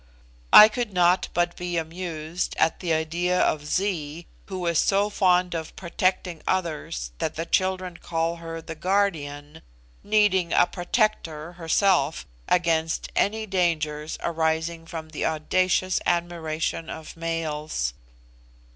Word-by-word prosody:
I 210 - +11
could 235 0 -3
not 180 0 +3
but 175 0 0
be 175 -1 -3
amused 165 0 -4
at 160 - +2
the 175 -3 -2
idea 170 +3 0
of 150 -1 +1
Zee, 170 -3 -2 0.2
who 185 -2 -4
is 170 -1 +2
so 200 +1 +2
fond 180 -2 +3
of 160 -2 -5
protecting 180 -1 -1
others 155 - -2
that - - -2 0.2
children 185 -2 0
call 165 0 -2
her 165 -1 -7
'THE 165 - -6
GUARDIAN,' 160 -5 -1 0.4
needing 205 -5 +2
a - - +5
protector 175 -5 -1
herself 165 - +1 0.2
against 165 -2 +1
any 220 +2 +1
dangers 160 -6 -1
arising 165 0 -1
from 160 -1 -7
the 155 - -4
audacious 185 +4 +1
admiration 165 -2 -1
of 160 -1 -8
males. 155 - -2
170 Hz, 120 wpm, -25 LUFS, 160-185 Hz, 0.4 s, I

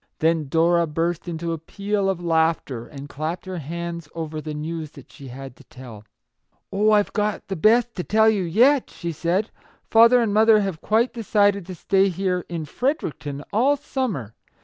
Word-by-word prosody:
Then 160 -2 +1
Dora 170 +3 +2
burst 165 +3 -2
into 170 0 -3
a 165 - -5
peal 200 +4 -2
of 180 -2 -3
laughter, 160 -7 0
and 140 -1 -9
clapped 155 +5 -5
her 185 -2 -5
hands 170 +1 -6
over 160 -2 -5
the 150 0 -6
news 155 +1 -5
that 140 - -15
she 140 - -12
had 130 +1 -9
to - - -16
tell. 115 -5 -12 0.3
" 125 - -25
Oh, 210 +2 +3
I've 210 -1 +3
got 210 -1 -2
the 195 - -2
best 230 +7 +3
to 180 - -2
tell 220 +3 +3
you 210 -4 +2
yet/' 245 - +3
she 170 -1 -5
said. 175 +7 -1 0.2
" - - -33
Father 230 +2 +7
and 225 -4 0
mother 220 0 +5
have 195 -5 -3
quite 225 +3 +1
decided 205 -4 +1
to 185 - -7
stay 195 +3 +2
here, 180 0 -2
in 165 -2 -4
Fredericton, 150 - -3
all 265 +7 +3
summer 245 - -3
175 Hz, 190 wpm, -23 LUFS, 155-210 Hz, 0.3 s, Father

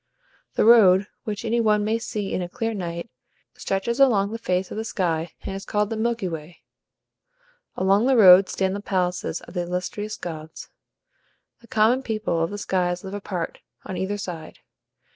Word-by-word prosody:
The - - +3
road, 200 -5 +7 0.2
which 210 +1 -4
any 230 +1 +1
one 210 -2 +2
may 225 +2 0
see 210 -3 -4
in - - -1
a 175 - -4
clear 225 +4 -3
night, 170 -3 -5 0.5
stretches 215 +6 -2
across 210 -7 +4
the 225 - -5
face 185 -3 -1
of - - -5
the 220 - -2
sky, 170 -6 -2
and 195 - -5
is 195 - -6
called 210 0 -1
the - - -1
Milky 230 -2 -1
Way. 165 0 -8 1.1
Along 195 +5 +3
the 265 -2 +4
road 190 -2 +8
stand 190 0 -1
the - - -3
palaces 180 -3 -1
of - - -13
the 180 - -1
illustrious 180 +5 -4
gods; 160 -5 -8 0.9
the 235 - -19
common 225 +5 +3
people 215 -9 -2
of 165 - -1
the 205 - -5
skies 180 -2 -1
live 190 0 -7
apart, 190 -4 -4 0.3
on 190 - -5
either 190 +3 -2
side. 180 -5 -7
195 Hz, 180 wpm, -24 LUFS, 180-220 Hz, 1.1 s, road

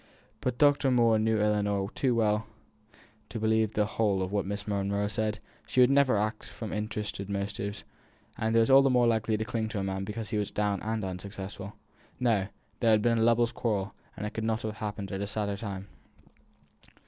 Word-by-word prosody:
But 125 -1 -2
Dr. 145 -2 +4
Moore 115 -3 +4
knew 110 0 +2
Ellinor 105 -2 +1
too 130 -3 +1
well 105 -1 +1 0.8
to 115 - -5
believe 110 0 +2
the 105 - +2
whole 105 -3 +1
of 95 - -4
what 100 -2 -1
Miss 100 +1 -4
Monro 100 0 0
said; 105 +1 -1 0.3
she - - 0
would 125 +1 +7
never 140 -5 +4
act 110 +1 -2
from 110 -3 -7
interested 105 -2 -4
motives, 100 0 -3 0.5
and 110 +1 -1
was 115 +3 +4
all 135 +1 +9
the 135 - +3
more 125 -1 +4
likely 110 -1 +1
to 110 - -2
cling 115 -2 -2
to 110 - -3
a - - -1
man 95 0 -2
because 105 +2 -5
he 105 - +1
was 105 - -2
down 105 -2 -1
and 110 -1 -2
unsuccessful. 95 +1 -6 0.5
No! 110 -6 +2 0.3
there 115 - +3
had 105 -1 +4
been 115 -1 +3
a - - +3
lovers' 115 +1 +3
quarrel; 105 -5 -2 0.2
and 105 - -4
it 105 - -3
could 110 - -3
not 110 0 -1
have 110 0 -4
happened 105 -2 -4
at 95 0 -3
a 100 - -2
sadder 100 -1 -1
time. 100 -2 -5
105 Hz, 200 wpm, -29 LUFS, 100-115 Hz, 0.8 s, all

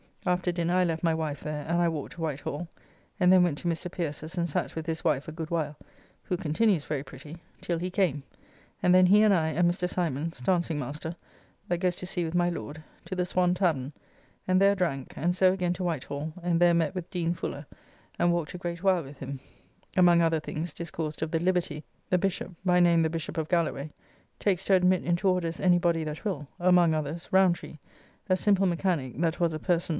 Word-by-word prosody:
After 180 0 +1
dinner 175 0 0
I 185 - +4
left 165 -1 -1
my 165 -1 +3
wife 155 -2 -3
there, 150 -1 -4
and 170 +1 +1
I 170 - +3
walked 155 -2 -5
to 165 - -9
Whitehall, 150 +1 -3 0.5
and 180 0 +5
then 185 - +7
went 165 -5 +1
to - - -4
Mr. 170 +1 -2
Pierce's 165 0 -5
and 170 0 +1
sat - - -2
with 160 -1 -4
his 160 -1 -3
wife 150 -3 +1
a - - -5
good 160 0 -6
while 150 -3 -2 0.5
(who 180 - -2
continues 175 0 +1
very 145 -3 -2
pretty) 140 +4 -11 0.2
till 170 -2 -2
he 180 +2 -2
came, 180 -7 +1 0.6
and 180 - +5
then 185 0 +6
he 205 +3 +6
and 210 -2 +5
I, 160 -4 +2
and 170 +3 +2
Mr. 180 0 -1
Symons 165 -4 -2
(dancing 170 +2 0
master), 150 +4 -5 0.5
that 175 - 0
goes 180 -1 +1
to - - -5
sea 180 -1 -2
with 165 +1 -3
my 175 0 +3
Lord, 160 -2 -6 0.2
to 185 - -5
the 180 -1 0
Swan 180 0 +1
tavern, 155 -7 0 0.5
and 185 +1 +3
there 200 0 +5
drank, 150 -9 -2
and 175 +3 0
so 185 0 +4
again 180 -2 0
to 180 +1 -5
White 165 -7 -1
Hall, 145 +2 -5
and 170 -1 +1
there 175 0 +5
met 165 -1 +1
with 180 -3 -5
Dean 170 -3 -1
Fuller, 145 -3 -5 0.5
and 175 - +3
walked 170 -3 -1
a - - -5
great 170 0 -5
while 185 -3 +3
with 140 0 -12
him; 135 0 -6 0.6
among 175 -2 +6
other 165 -1 +2
things 155 +2 -5
discoursed 160 -2 -5
of 160 - -3
the 165 - +1
liberty 175 -4 0 0.3
the 180 - +3
Bishop 190 0 -2
(by 180 -1 +3
name 170 -1 +5
the 160 0 -2
of 160 -1 -2
Galloway) 155 -4 0 0.5
takes 195 -3 +1
to 195 - +3
admit 180 0 +3
into 175 +3 0
orders 175 -3 0
any 180 -1 +4
body 170 -2 +1
that 155 +3 -6
will; 155 -9 -3
among 175 -2 +4
others, 155 +2 -3
Roundtree, 185 -4 +2 0.5
a 185 - +4
simple 195 -1 +3
mechanique 170 -7 -1
that 165 0 0
was 170 -2 +1
a 155 - -4
person 180 - +1
[parson? - - -10
170 Hz, 220 wpm, -28 LUFS, 155-180 Hz, 0.6 s, then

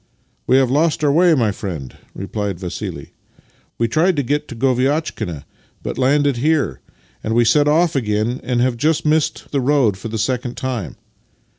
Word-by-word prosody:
" - - -44
We 130 - +5
have 130 -2 +2
lost 155 +2 +1
our 145 - +4
way, 170 +2 +4
my 115 -6 +2
friend," 85 - -6 0.2
replied 100 -1 -4
Vassili. 90 -2 -6 0.3
" - - -37
We 115 - +1
tried 165 - +2
to 145 - 0
get 145 +4 -1
to - - -8
Goviatchkina, 130 - -1 0.4
but - - -4
landed 140 0 +2
here. 145 - +1 0.4
Then 110 +1 -2
we 120 0 +4
set 145 +5 +4
off 160 +2 +3
again, 110 0 0
and 125 -1 -1
have 125 -1 +1
just 155 +5 +1
missed 155 0 0
the 140 - 0
road 130 -7 +2
for - - -6
the 110 0 -4
second 125 +2 -2
time." 125 -7 -4
130 Hz, 180 wpm, -19 LUFS, 110-150 Hz, 0.4 s, We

